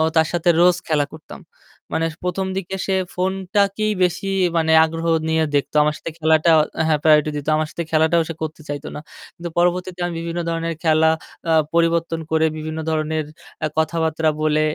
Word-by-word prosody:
তার 160 0 +4
সাথে 175 0 +1
রোজ 180 0 +5
খেলা 150 -2 +2
করতাম। 160 0 -11 0.5
মানে 165 - +1 0.2
১ম 180 +1 -1
দিকে 190 0 -4
সে 190 - 0 0.2
ফোনটাকেই 195 +3 0
বেশি 180 +2 -1 0.3
মানে 160 -1 +2
আগ্রহ 165 +1 -5 0.2
নিয়ে 160 0 +2
দেখতো, 145 +1 -1
আমার 150 0 0
সাথে 165 - -6
খেলাটা 160 +1 +3 0.4
হ্যাঁ 155 -2 +2
প্রায়োরিটি 150 -1 +4
দিত, 145 -1 -5
আমার 155 0 -1
সাথে 170 - -4
খেলাটাও 160 +1 +3
সে - - -3
করতে 155 0 -6
চাইতো 145 +1 -5
না। - - -5 0.4
কিন্তু 170 0 -6
পরবর্তীতে 180 +1 0
আমি 175 - -5
বিভিন্ন 170 +1 -4
ধরনের 165 0 -2
খেলা 160 0 +4 0.4
আ 160 - +4 0.2
পরিবর্তন 165 0 +1
করে 160 0 +3
বিভিন্ন 155 +1 -5
ধরনের 155 0 -1 0.4
এ - - +2
কথাবার্তা 160 0 +1
বলে 155 0 +2
160 Hz, 170 wpm, -21 LUFS, 155-175 Hz, 0.5 s, রোজ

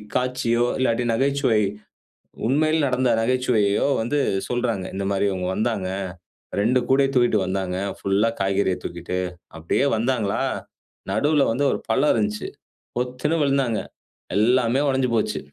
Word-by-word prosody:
காட்சியோ, 125 -2 +1
இல்லாட்டி 125 -2 +1
நகைச்சுவை, 135 -3 +2 0.9
உண்மையில 155 +3 +2
நடந்த 130 -1 +1
நகைச்சுவையையோ 115 -3 +2
வந்து 145 +6 0 0.3
சொல்றாங்க. 120 -6 -1
இந்த 100 0 -2
மாரி 100 +1 +1
இவுங்க 90 -1 -2
வந்தாங்க. 110 -5 -1 0.7
2 120 +5 +3
கூடைய 135 +1 +4
தூக்கிட்டு 120 -4 +3
வந்தாங்க. 95 -1 -2 0.2
புல்லா 100 +3 +2
காய்கறிய 95 -1 +1
தூக்கிட்டு, 85 +1 -4 0.4
அப்டியே 85 - +1
வந்தாங்களா! 115 -3 0 0.7
நடுவுல 145 -1 +2
வந்து 140 +5 0
ஒரு - - -1
பள்ளம் 145 +3 +3
இருந்துச்சு. 105 -1 -1 0.5
பொத்துன்னு 125 +6 -1
வுழுந்தாங்க. 135 -5 +1 0.6
எல்லாமே 120 +3 +3
உடைஞ்சு 130 -2 +1
போச்சு. 110 - 0
120 Hz, 120 wpm, -23 LUFS, 105-130 Hz, 0.9 s, கூடைய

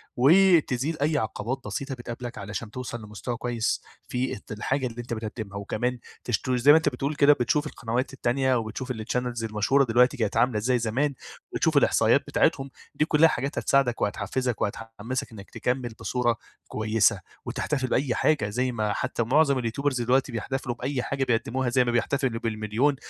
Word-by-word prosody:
وتزيل 155 -1 +4
أي 150 +1 +2
عقبات 115 +3 -3
بسيطة 140 -2 -4
بتقابلك 120 0 -7
علشان 105 +2 -6
توصل 120 -1 -6
لمستوى 110 +3 -5
كويّس، 120 -2 -1 0.3
في 125 +1 -2
ات - - -13
الحاجة 130 +5 -1
اللي 120 0 -6
أنت 120 0 -6
بتقدمها، 110 -2 -5
وكمان 120 +5 -2 0.2
تشت 120 +2 -1
زي 125 +3 +5
ما 155 - +8
أنت 160 - +2
بتقول 140 +3 -3
كده 145 0 +6
بتشوف 145 +3 0
القنوات 120 -1 -3
التانية 130 0 +1
وبتشوف 120 +3 -3
الchannels 120 +1 -3
المشهورة 110 +6 +2
دلوقتي 125 +2 +3
كانت 110 -2 -1
عاملة 115 -1 +3
إزاي 125 +3 +1
زمان، 130 +6 0 0.4
وتشوف - - +2
الإحصائيات - - +4
بتاعتهم، 135 0 +1 0.3
دي 155 - +2
كلّها 160 +1 +5
حاجات 140 -1 -2
هتساعدك 135 -4 +2
وهتحفزك 110 +4 -1
وهتحمسك 115 +5 -4
إنّك 100 -3 -11
تكمل 125 -1 -2
بصورة 120 -2 0 0.3
كويّسة 110 -2 +2 0.3
وتحتفل 135 -4 -2
بأي 130 0 0
حاجة 125 -10 +2
زي 125 +4 0
ما 110 -3 -1
حتّى 130 -2 -1
معظم 140 +2 +3
اليوتيوبرز 125 +2 -1
دلوقتي 130 +3 +2
بيحتفلوا 120 +2 -3
بأي 125 +1 -2
حاجة 135 -1 -1
بيقدموها 125 +1 0
زي 125 +1 +3
ما 120 - 0
بيحتفلوا 120 0 0
بال1.000.000، 115 +5 0
125 Hz, 165 wpm, -26 LUFS, 115-135 Hz, 0.4 s, ما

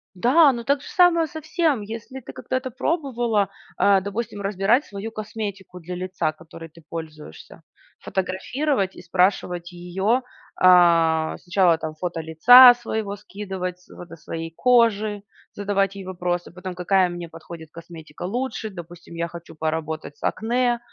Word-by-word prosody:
Да, 275 - +5
ну 240 -2 -5
так 280 +2 +1
же - - -12
самое 340 -2 +4
со 315 +1 -8
всем, 315 -5 0
если 225 +5 -8
ты - - -11
когда-то 260 0 -4
пробовала, 240 - 0 0.3
а, 200 -1 +4
допустим, 205 +2 -5
разбирать 200 +7 +1
свою 205 +2 -7
косметику 205 -4 -6
для 180 +1 -7
лица, 180 -3 -2
которой 165 +1 -12
ты 165 +2 -18
пользуешься, 155 - -9 0.4
фотографировать 195 +4 -2
и - - -11
спрашивать 180 -1 0
её, 190 +7 -1 0.3
а, 170 -3 +4
сначала 175 -2 +2
там 160 -1 -5
фото 170 0 -4
лица 245 +11 +9
своего 220 -4 -4
скидывать, 190 -3 -6
с 180 - -18
фото 175 -1 -10
своей 165 +1 -7
кожи, 220 -4 +2 0.3
задавать 200 -1 0
ей 195 -1 -8
вопросы, 175 -1 -3
потом 180 +1 -7
какая 180 +1 +2
мне 175 -1 -7
подходит 165 0 -11
косметика 165 -2 -11
лучше, 225 +3 -3
допустим 175 -2 -11
я 170 0 -2
хочу 170 -1 -11
поработать 155 -1 -4
с - - -19
акне, 240 +2 0
190 Hz, 145 wpm, -23 LUFS, 170-230 Hz, 0.4 s, лица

